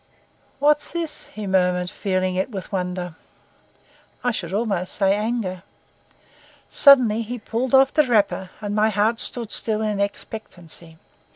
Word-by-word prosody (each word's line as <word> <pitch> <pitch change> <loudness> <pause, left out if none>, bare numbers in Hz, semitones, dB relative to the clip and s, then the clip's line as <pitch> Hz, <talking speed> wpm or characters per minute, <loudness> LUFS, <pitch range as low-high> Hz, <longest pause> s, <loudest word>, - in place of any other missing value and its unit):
"What's 295 +1 +2
this?" 330 -3 -4
he 215 -1 -8
murmured, 180 -1 +1
feeling 185 -2 -1
it 190 +6 -1
with 195 -4 -7
wonder, 180 -2 -3 1.1
I 245 - +2
should 180 -7 -4
almost 200 -3 -1
say 195 -1 +3
anger. 210 -4 -2 1.1
Suddenly 250 -6 +6
he 235 +2 -5
pulled 240 +3 -1
off 265 0 +5
the 305 -3 +3
wrapper, 205 -5 +1
and 205 -1 -3
my 215 +1 +3
heart 215 +2 +1
stood 235 -3 -1
still 220 -1 +1
in 210 -2 -1
expectancy. 175 -5 -6
210 Hz, 135 wpm, -22 LUFS, 185-235 Hz, 1.1 s, Suddenly